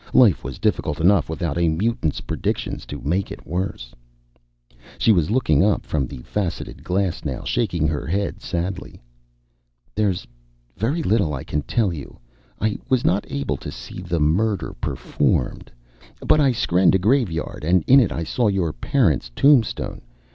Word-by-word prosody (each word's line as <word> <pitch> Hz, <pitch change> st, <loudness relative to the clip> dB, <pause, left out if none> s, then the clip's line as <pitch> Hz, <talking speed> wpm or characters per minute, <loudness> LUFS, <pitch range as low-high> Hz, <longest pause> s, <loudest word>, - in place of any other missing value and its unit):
Life 110 Hz, -, +5 dB
was 65 Hz, -, -6 dB
difficult 85 Hz, -8 st, 0 dB
enough 85 Hz, -2 st, +3 dB
without 80 Hz, -1 st, -2 dB
a 85 Hz, -, +3 dB
mutant's 80 Hz, -, -1 dB
predictions -, -, -3 dB
to 75 Hz, -, -6 dB
make 90 Hz, +7 st, -1 dB
it -, -, -9 dB
worse. 85 Hz, -8 st, -4 dB, 1.0 s
She 115 Hz, -, +4 dB
was 85 Hz, -7 st, +2 dB
looking 105 Hz, -, +3 dB
up 105 Hz, 0 st, +1 dB
from 70 Hz, -4 st, -1 dB
the 65 Hz, -2 st, -9 dB
faceted 95 Hz, -5 st, -4 dB
glass 90 Hz, -1 st, -1 dB
now, -, -, -4 dB
shaking 85 Hz, -9 st, 0 dB
her 75 Hz, 0 st, -2 dB
head 100 Hz, +5 st, -2 dB
sadly. 90 Hz, +1 st, -4 dB, 0.9 s
"There's 100 Hz, -3 st, 0 dB, 0.5 s
very 140 Hz, -, -1 dB
little 100 Hz, -, +1 dB
I 65 Hz, -, -6 dB
can 75 Hz, -, -2 dB
tell 105 Hz, +2 st, 0 dB
you. 75 Hz, -4 st, -9 dB, 0.4 s
I 110 Hz, -1 st, 0 dB
was 130 Hz, -2 st, +2 dB
not 95 Hz, +3 st, +1 dB
able 140 Hz, 0 st, -2 dB
to -, -, -7 dB
see -, -, -9 dB
the 85 Hz, -2 st, -2 dB
murder 95 Hz, +8 st, +1 dB
performed. -, -, -1 dB, 0.6 s
But 155 Hz, -, +4 dB
I 140 Hz, -2 st, +4 dB
skrenned 95 Hz, -6 st, +3 dB
a -, -, +6 dB
graveyard, 95 Hz, -, 0 dB
and 85 Hz, +1 st, +3 dB
in 135 Hz, +2 st, +7 dB
it 115 Hz, -8 st, +2 dB
I 85 Hz, -, -2 dB
saw 115 Hz, +8 st, 0 dB
your 95 Hz, -6 st, 0 dB
parents' 95 Hz, -, +1 dB
tombstone. 140 Hz, -5 st, +3 dB
90 Hz, 160 wpm, -22 LUFS, 80-110 Hz, 1.0 s, in